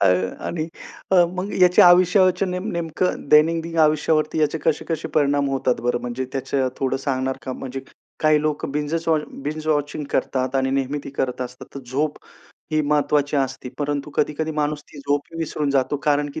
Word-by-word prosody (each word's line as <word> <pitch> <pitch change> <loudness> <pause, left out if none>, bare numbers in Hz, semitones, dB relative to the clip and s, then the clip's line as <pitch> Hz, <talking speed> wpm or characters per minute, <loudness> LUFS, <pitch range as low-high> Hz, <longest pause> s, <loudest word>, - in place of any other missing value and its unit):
अ, 95 - +4 0.4
आणि 160 -2 -2 0.5
अ, 180 -2 +7
मग 185 +3 -4
याच्या 180 0 +7
आयुष्यावरचे 185 +1 +4
नेम 180 +3 -3
नेमकं 170 -2 -2
दैनंदिन 165 +2 +3
आयुष्यावरती 155 0 +2
याचे 150 +1 +1
कसे-कसे 160 0 -1
परिणाम 145 -1 +2
होतात 130 -2 0
बरं? 120 0 0
म्हणजे 125 +1 -3
त्याचं 135 0 -1
थोडं 135 0 0
सांगणार 130 -1 -2
का? 130 - -4
म्हणजे 135 +1 -6 0.4
काही 155 -1 +4
लोकं 150 -2 -1
बिंजचं 155 +3 -1
वॉ 160 - +4 0.2
बिंज-वॉचिंग 150 -1 -2
करतात 130 0 -1
आणि 130 0 +1
नेहमी 135 +1 -1
ते - - -7
करत 130 -2 -2
असतात 125 0 -8
तर 140 - -6
झोप 150 +3 0 0.6
ही 155 - +3
महत्त्वाची 145 0 +1
असते 135 -1 -2
परंतु 145 0 -2
कधी-कधी 155 +2 0
माणूस 150 0 -1
ती 145 - -13
झोप 145 +1 0
ही 165 - -7
विसरून 150 -2 -1
जातो 140 +1 +1
कारण 145 0 +2
की 160 - -4
150 Hz, 170 wpm, -22 LUFS, 135-160 Hz, 0.6 s, अ